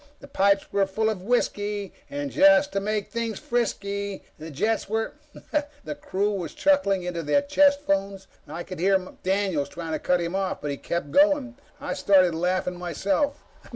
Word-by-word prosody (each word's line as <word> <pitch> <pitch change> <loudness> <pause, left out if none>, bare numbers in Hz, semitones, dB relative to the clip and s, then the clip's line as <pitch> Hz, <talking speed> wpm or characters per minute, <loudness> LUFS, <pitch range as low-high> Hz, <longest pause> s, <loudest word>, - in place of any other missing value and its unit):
The 280 - -12
pipes 200 -6 +2
were 200 -1 +2
full 220 +3 0
of 200 -4 -5
whisky, 205 -2 -1 0.2
and 285 0 -4
just 295 0 +5
to 195 - +1
make 210 0 -2
things 230 -2 -3
risky, 200 -4 -1 0.2
the 160 +1 -7
jets 210 +9 -1
were 220 +1 -1 0.2
..._" 300 -1 -2 0.2
The - - -4
crew 205 -7 -1
were 185 -4 -3
chuckling 200 - +2
into 175 -1 -3
their 165 - +2
own - - -15
chest 285 0 +4
phones. 195 -5 -1 0.2
I 160 +4 -6
could 185 -3 -8
hear 190 +2 +4 0.2
Daniels 190 -6 0
trying 165 -1 -6
to 155 - -1
cut 180 +3 +1
him 170 0 -3
off. 195 -1 -1
But 145 -1 -3
he 140 - -4
kept 170 -2 -3
going. 290 - +3 0.2
I 285 - -3
started 185 -3 +4
laughing 180 +1 -1
myself. 195 - -1
200 Hz, 185 wpm, -25 LUFS, 180-240 Hz, 0.2 s, just